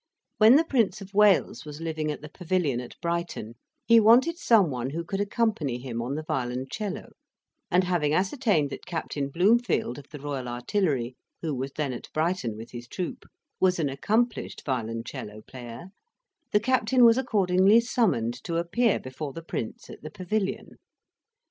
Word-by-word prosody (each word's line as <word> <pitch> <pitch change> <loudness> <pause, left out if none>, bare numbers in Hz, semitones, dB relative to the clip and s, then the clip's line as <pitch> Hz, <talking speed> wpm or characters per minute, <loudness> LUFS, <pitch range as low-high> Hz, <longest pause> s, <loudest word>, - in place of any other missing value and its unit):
When 220 +4 +8
the 310 - +6
Prince 240 -9 +1
of 195 +1 -11
Wales 200 - +4
was 150 0 -9
living 160 -2 -3
at 150 - -4
the 150 - -9
Pavilion 170 -7 -1
at 125 - -11
Brighton, 170 -10 -3 0.3
he 230 0 +7
wanted 245 +10 +5
some 205 - +4
one 125 0 -3
who 165 +4 -4
could 195 +3 -3
accompany 205 - 0
him 120 -2 -5
on 125 +4 -3
the 155 - -4
violoncello, 135 - -4 0.6
and 180 +1 +3
having 175 -5 +1
ascertained 190 - +1
that - - -8
Captain 150 -5 -3
Bloomfield, 190 - +2
of 145 - -14
the 150 - -8
Royal 135 -3 -4
Artillery, 125 - -1 0.3
who 160 -3 -1
was 135 +1 -4
then 145 -4 -2
at 120 - -9
Brighton 155 -9 -1
with 115 +1 -9
his 120 0 -8
troop, 180 +7 -5 0.3
was 185 -1 +3
an 155 -4 0
accomplished 220 - -1
violoncello 115 -4 -4
player, 125 +6 -9 0.6
the 210 - +4
captain 255 +1 +3
was 230 +2 +6
accordingly 200 -3 +4
summoned 185 - +1
to 170 - -3
appear 205 +7 +1
before 135 +2 -6
the 165 - -8
Prince, 115 -8 -5
at - - -11
the 155 - -7
Pavilion. 190 +4 -3
165 Hz, 165 wpm, -27 LUFS, 130-210 Hz, 0.6 s, When